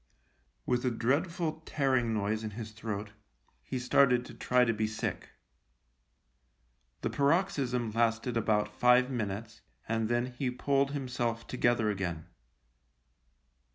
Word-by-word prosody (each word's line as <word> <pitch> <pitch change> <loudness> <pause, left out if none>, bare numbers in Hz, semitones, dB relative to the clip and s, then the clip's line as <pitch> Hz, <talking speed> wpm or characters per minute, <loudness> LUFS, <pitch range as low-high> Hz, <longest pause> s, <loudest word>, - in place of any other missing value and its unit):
With 125 -1 +1
a 130 - +2
dreadful 155 +7 -1
tearing 130 -6 +1
noise 110 +1 -1
in 110 - -3
his 110 -2 -6
throat, 110 -1 -5 0.5
he 130 - -4
started 125 0 +3
to 120 - -10
try 125 +2 +2
to 115 - +1
be 110 0 0
sick. 110 0 -4 1.7
The - - -1
paroxysm 140 - +1
lasted 115 +2 +1
about 105 -2 +1
five 125 +1 +4
minutes, 110 -1 -4 0.3
and 115 0 0
then 120 +1 0
he 130 - +1
pulled 135 +2 +1
himself 125 -4 -2
together 120 -3 +1
again. 90 -5 -3
120 Hz, 120 wpm, -31 LUFS, 110-130 Hz, 1.7 s, five